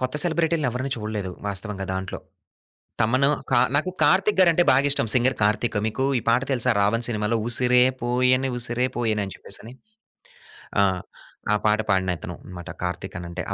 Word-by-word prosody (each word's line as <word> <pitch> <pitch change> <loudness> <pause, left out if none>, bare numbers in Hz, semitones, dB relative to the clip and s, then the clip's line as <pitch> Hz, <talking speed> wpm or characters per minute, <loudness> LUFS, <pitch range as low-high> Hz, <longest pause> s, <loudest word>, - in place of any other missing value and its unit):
కొత్త 130 +1 -2
సెలబ్రిటీలని 165 -4 +1
ఎవరిని 130 +3 -4
చూడలేదు 105 -4 -4 0.2
వాస్తవంగా 100 0 -4
దాంట్లో. 95 0 -4 0.8
తమను 130 +5 +2 0.2
కా - - +4 0.2
నాకు 155 +6 +1
కార్తీక్ 195 +1 +3
గారంటే 175 -2 +5
బాగిష్టం. 135 -2 +2
సింగర్ 125 +1 +2
కార్తీక్. 105 +2 +1
మీకు 125 +5 -2 0.2
ఈ - - -10
పాట 120 +3 +3
తెలుసా 125 -1 +1
'రావణ్' 115 +4 +1
సినిమాలో 105 +1 -1
'ఉసిరే 125 +1 +4 0.2
పోయను 125 +2 +2
ఉసిరే 120 +1 0
పోయను' 110 -3 0
అని 95 - -8
చెప్పేసని 115 +4 -5 1.1
ఆ! - - +5 0.7
ఆ - - +3
పాట 105 +1 +3
పాడిన 95 -2 +1
అతను - - -7
అన్నమాట. 90 -2 -9
కార్తీక్ 90 +2 -4
అనంటే. 85 +1 -6
120 Hz, 150 wpm, -23 LUFS, 105-130 Hz, 1.1 s, గారంటే